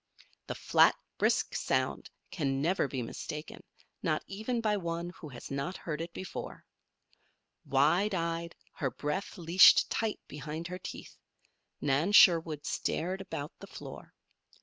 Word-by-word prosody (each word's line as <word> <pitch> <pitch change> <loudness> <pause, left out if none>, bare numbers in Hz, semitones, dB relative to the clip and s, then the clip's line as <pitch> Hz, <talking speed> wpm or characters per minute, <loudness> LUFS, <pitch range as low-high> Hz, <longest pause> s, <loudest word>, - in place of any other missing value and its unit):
The - - -4
flat, - - +5 0.2
brisk - - +2
sound - - -1 0.2
can 135 -5 -1
never 165 +1 +1
be 130 -2 -3
mistaken, 150 +6 -7 0.4
not 155 -2 0
even 220 +5 -3
by 215 -2 +1
one 170 -2 -3
who 160 -4 -10
has 125 0 -10
not 140 +7 -3
heard 155 -2 -4
it 165 +1 -5
before. 185 - -7 1.0
Wide 170 +9 +3
eyed, 170 -1 -2 0.2
her 135 - -2
breath 150 - -4
leashed 175 +2 +6
tight 225 -2 -1
behind 150 +3 -6
her 180 0 -5
teeth, - - -9 0.6
Nan 145 +8 +1
Sherwood 165 -6 +6
stared 185 +4 -2
about 150 -6 -5
the - - -10
floor. - - -10
165 Hz, 135 wpm, -31 LUFS, 150-185 Hz, 1.0 s, leashed